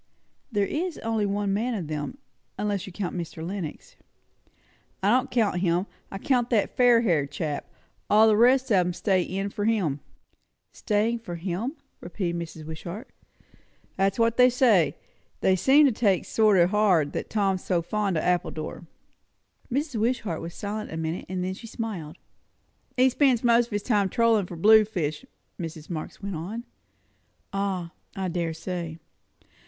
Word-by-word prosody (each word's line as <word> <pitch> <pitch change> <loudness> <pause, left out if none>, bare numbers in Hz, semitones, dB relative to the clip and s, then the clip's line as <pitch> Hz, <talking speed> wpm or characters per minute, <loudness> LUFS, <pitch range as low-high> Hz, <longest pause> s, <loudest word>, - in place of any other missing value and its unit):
"There 205 -3 +1
is 335 - -3
only 225 -2 0
one 200 0 -1
man 230 +4 0
of 185 -6 -3
them; 150 - -4 0.4
unless 205 -3 -2
you - - -8
count 185 0 -4
Mr. 165 -2 -5
Lenox." 180 -4 -6 1.1
"I 200 - +4
don't 255 +3 +2
count 215 -7 +1
him. 175 0 +1 0.2
I 195 - -6
count 245 +2 +1
that 220 -4 +1
fair 245 -2 +5
haired 160 -11 +1
chap. 145 0 -4 0.4
All 215 +2 +6
the 215 - +5
rest 255 +3 +4
of 200 - +5
'em 180 -1 +2
are - - -3
stay 190 0 +1
in' 195 +3 -3
for 205 -1 -3
him." 190 -11 +1 0.7
"Staying 220 +2 0
for 215 -7 -7
him!" 185 - -3 0.3
repeated 175 -1 -3
Mrs. 160 -2 -8
Wishart. 170 - -7 0.8
"That's 195 0 +1
what 230 0 +2
they 250 0 +7
say. 235 - +3 0.4
They 190 - +4
seem 270 - +5
to 275 - +4
take 205 -5 +2
it - - -16
sort 215 -3 +3
o' 170 - +6
hard, 185 -7 +2
that - - -4
Tom's 195 -3 0
so 175 -3 0
fond 200 -1 -1
of - - -1
Appledore." 170 -1 -2 0.8
Mrs. 275 -2 -1
Wishart 220 -7 -1
was 165 0 -7
silent 210 +1 -5
a 160 - -5
minute, 160 +1 -3
and 185 -1 -2
then 185 +1 -2
she 230 +4 -10
smiled. 190 -9 -5 0.8
"He 255 +1 +6
spends 255 -3 +3 0.3
his 205 -3 -3
time 205 -5 +2
trollin' 225 -3 +2
for 175 - -8
blue 215 +6 +7
fish," 185 - -3 0.3
Mrs. 165 -1 -7
Marx 160 +4 -6
went 200 -2 -3
on. 200 +9 -5 0.9
"Ah, 190 -4 -2 0.2
I 190 -1 -2
dare 170 -2 -2
say. 170 -1 -5
195 Hz, 165 wpm, -26 LUFS, 175-225 Hz, 1.1 s, they